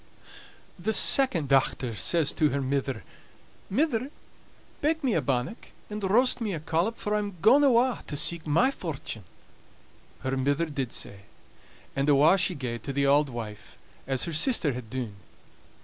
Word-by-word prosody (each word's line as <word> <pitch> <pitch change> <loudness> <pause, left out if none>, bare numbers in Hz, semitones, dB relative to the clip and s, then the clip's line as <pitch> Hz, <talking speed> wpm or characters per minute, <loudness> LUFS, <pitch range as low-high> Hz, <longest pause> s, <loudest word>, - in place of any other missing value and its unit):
The 220 +5 -1
second 200 - +3
dochter 135 -2 +2
next 110 - -5
says 165 -4 +2
to 155 - +2
her 140 - -1
mither: 135 0 -2 0.7
"Mither, 260 +2 0 0.7
bake 320 +1 0
me 255 -4 +2
a 160 - +2
bannock, 130 - -2 0.2
and 210 0 -5
roast 245 +6 +3
me 210 -5 -1
a - - -4
collop, 165 +8 -1
fur 210 - -2
I'm 205 -2 -1
gaun 275 - +6
awa' 255 -2 +3
to 145 - -4
seek 170 +2 +1
my 235 - +3
fortune." 150 - -6 1.0
Her 130 0 -1
mither 140 +5 +1
did 140 -6 -4
sae; 100 0 -5 0.7
and 140 +2 +1
awa' 150 +6 +6
she 180 0 +1
gaed 125 -5 -4
to 140 - -5
the 140 +1 +1
auld 145 +1 +4
wife, 110 -4 -8 0.3
as 135 -2 0
her 170 - -4
sister 155 - +2
had 120 -2 -7
dune. 120 -5 -5
150 Hz, 165 wpm, -27 LUFS, 135-210 Hz, 1.0 s, gaun